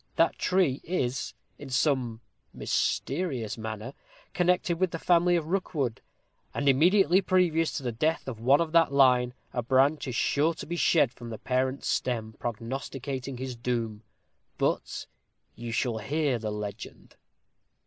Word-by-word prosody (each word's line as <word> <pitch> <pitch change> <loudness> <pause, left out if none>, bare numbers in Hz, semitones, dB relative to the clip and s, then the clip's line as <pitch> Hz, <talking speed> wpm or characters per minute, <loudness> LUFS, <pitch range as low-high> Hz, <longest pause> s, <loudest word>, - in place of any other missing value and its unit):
That 165 - +2
tree 180 -7 +2
is, 135 -7 -2 0.2
in 145 - -9
some 130 -4 0 0.3
mysterious 135 - -1
manner, 110 +3 -6 0.4
connected 180 -1 +1
with 185 -1 +2
the 165 - -4
family 175 +1 +3
of 165 -3 0
Rookwood, 155 - -2 0.5
and 140 - -1
immediately 175 +6 +5
previous 175 -4 +2
to 140 - -4
the 125 - -1
death 155 +9 -1
of 120 -4 -5
one 135 +7 +4
of 165 -2 -1
that 165 -3 +4
line, 125 -2 +4 0.2
a 125 - 0
branch 135 +5 +2
is 125 - -3
sure 155 +7 +2
to - - -7
be 170 - -4
shed 160 -6 +3
from 120 -1 -9
the 110 - -5
parent 130 +2 -1
stem, 110 -3 -1
prognosticating 130 +3 -4
his 130 0 -5
doom. 115 -3 -2 0.6
But - - -1 0.5
you 120 0 -7
shall 115 -1 -1
hear 140 +2 0
the 110 -1 -3
legend." 105 -1 -7
135 Hz, 150 wpm, -28 LUFS, 120-165 Hz, 0.6 s, immediately